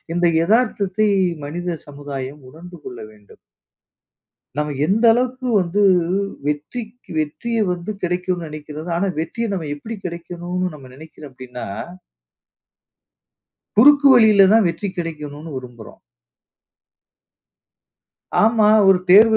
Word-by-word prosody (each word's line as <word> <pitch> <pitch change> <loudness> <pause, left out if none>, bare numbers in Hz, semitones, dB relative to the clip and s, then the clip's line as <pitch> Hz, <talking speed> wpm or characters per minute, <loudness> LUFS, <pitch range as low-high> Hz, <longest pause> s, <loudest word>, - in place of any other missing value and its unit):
இந்த 175 0 +1 0.2
எதார்த்தத்தை 215 -1 +1 0.4
மனித 175 +3 -4
சமுதாயம் 140 -1 -7
உணர்ந்து 175 +5 -12
கொள்ள 125 - -8
வேண்டும். 105 -1 -19 1.2
நம்ப 150 0 -1 0.2
எந்த 220 +5 +1
அளவுக்கு 255 +1 -1
வந்து, 185 +4 0 0.6
வெற்றிக் 220 - -5
வெற்றிய 225 +10 -2
வந்து 175 +3 -5
கிடைக்கும்னு 180 -1 -2
நினைக்கிறது, 150 +2 -8
ஆனா 195 +3 0
வெற்றிய 230 +8 -3
நம்ம 160 -5 -4
எப்படி 220 +9 -7
கிடைக்கணும்னு 175 +1 -4
நம்ப 135 -3 -12
நினைக்கிறோம் 155 -2 -12
அப்படினா 125 -1 -8 2.1
குறுக்கு 285 +4 +7
வழியில 215 -5 +6
தான் 225 -2 +5
வெற்றி 170 +5 -3
கிடைக்கணும்னு 155 -2 -6
விரும்புறோம். 120 -3 -10 2.4
ஆமா. 220 -1 +4 0.2
ஒரு 190 -1 +6
தேர்வு 220 +3 +7
175 Hz, 100 wpm, -20 LUFS, 150-215 Hz, 2.4 s, குறுக்கு